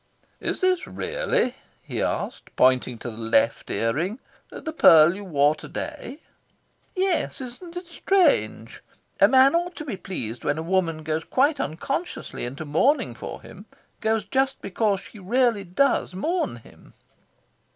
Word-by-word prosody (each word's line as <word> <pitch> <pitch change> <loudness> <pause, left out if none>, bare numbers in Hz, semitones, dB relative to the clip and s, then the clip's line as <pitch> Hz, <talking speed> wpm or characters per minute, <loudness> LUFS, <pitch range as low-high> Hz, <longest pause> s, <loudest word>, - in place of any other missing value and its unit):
"Is - - -3
this 370 -1 +2
really," - - -1 0.3
he - - -4
asked, - - -3
pointing 130 -1 +3
to 120 - -6
the 110 - -11
left 115 0 +1
ear 115 0 0
ring, 185 - -2 0.3
"the 320 - -7
pearl 165 - +7
you 200 +2 -8
wore 150 -5 +3
to 155 - -11
day?" 250 - -6 0.8
"Yes. 375 -2 0
Isn't 300 +8 -8
it 355 - -6
strange? 370 +2 +1 0.4
A - - +7
man 265 +2 +6
ought 350 +1 0
to 305 - -7
be 235 -9 -4
pleased 120 - -6
when 145 - 0
a 160 - -3
woman 165 -3 0
goes 160 +1 -2
quite 280 - +2
unconsciously 275 - -4
into 135 +5 -6
mourning 245 - +2
for - - -8
him - - -13 0.3
goes 220 -1 0
just 265 0 0
because 200 0 0
she 215 - -13
really 230 +1 +1
does 195 +1 +1
mourn 330 - -1
him." 115 - -17
205 Hz, 150 wpm, -24 LUFS, -, 0.8 s, pearl